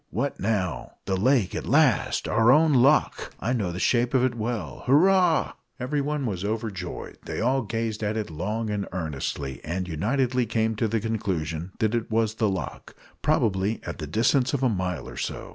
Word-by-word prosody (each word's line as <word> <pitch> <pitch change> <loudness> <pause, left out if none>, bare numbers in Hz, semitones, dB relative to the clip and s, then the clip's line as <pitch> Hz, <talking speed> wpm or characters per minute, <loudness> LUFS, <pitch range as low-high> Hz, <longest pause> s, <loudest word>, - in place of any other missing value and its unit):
"What 140 - -2
now?" 100 -4 -1
"The 95 - 0
lake 110 +1 +2
at - - -4
last! - - +3
Our 115 +2 +4
own 155 +2 +5
loch! 135 +4 +3
I 120 +4 -1
know 100 -8 -1
the 85 - -5
shape 120 +5 +2
of 130 - +4
it 130 -2 +2
well! 110 - -4
Hurrah!" 175 +4 +4 0.3
Everyone 145 +2 -1
was 95 -5 -3
overjoyed. 110 -2 -4
They - - -4
all 130 +4 +2
gazed 115 -1 -3
at 105 +1 -1
it 105 -6 -3
long 105 +7 -2
and 100 -1 -2
earnestly, 70 -5 -4
and 90 +3 -3
unitedly 120 - 0
came 110 0 0
to 115 - +1
the 115 +1 0
conclusion 95 -6 -3
that 110 -1 +1
it 115 -2 -1
was 110 -1 +1
the 110 -1 +1
loch 95 -6 -5 0.3
probably 100 +1 +1
at 85 - -6
the 75 - -4
distance 120 - +2
of 135 - -2
a 130 - +4
mile 90 -5 -2
or - - -9
so. - - -4
110 Hz, 185 wpm, -26 LUFS, 95-125 Hz, 0.3 s, own